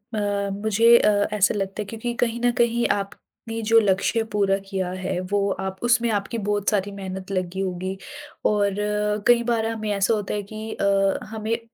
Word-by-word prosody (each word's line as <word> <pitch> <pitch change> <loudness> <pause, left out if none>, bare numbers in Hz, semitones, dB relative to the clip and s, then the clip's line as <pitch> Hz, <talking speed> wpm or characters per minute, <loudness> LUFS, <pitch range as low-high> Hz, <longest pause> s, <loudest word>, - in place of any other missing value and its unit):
अ, 205 -1 -1
मुझे 220 +3 +5
अ, 210 - +4 0.3
ऐसा 200 -2 +3
लगता 195 0 -3
है - - -4
क्योंकि 225 +3 -4
कहीं 235 -1 0
न 245 0 +3
कहीं 235 0 +2
आपने 225 +3 -5
जो 225 +1 +5
लक्ष्य 205 +2 +1
पूरा 200 -2 +2
किया 190 -2 -2
है 185 -1 -3
वो 200 -1 +2
आप 190 0 -4
उसमें 240 -1 +3
आपकी 205 +3 -2
बहुत 205 -1 0
सारी 205 -2 0
मेहनत 190 -1 -7
लगी 185 0 -2
होगी 185 0 -3 0.5
और 200 -2 +1 0.5
कई 240 -1 +5
बार 230 -2 0
हमें 220 -1 -3
ऐसा 200 +2 +2
होता 210 -3 -2
है 205 -1 -2
कि 215 +2 -7
अ, 195 -1 +2
हमें 220 +1 -2
अ, 235 - -6
205 Hz, 185 wpm, -23 LUFS, 195-225 Hz, 0.5 s, मुझे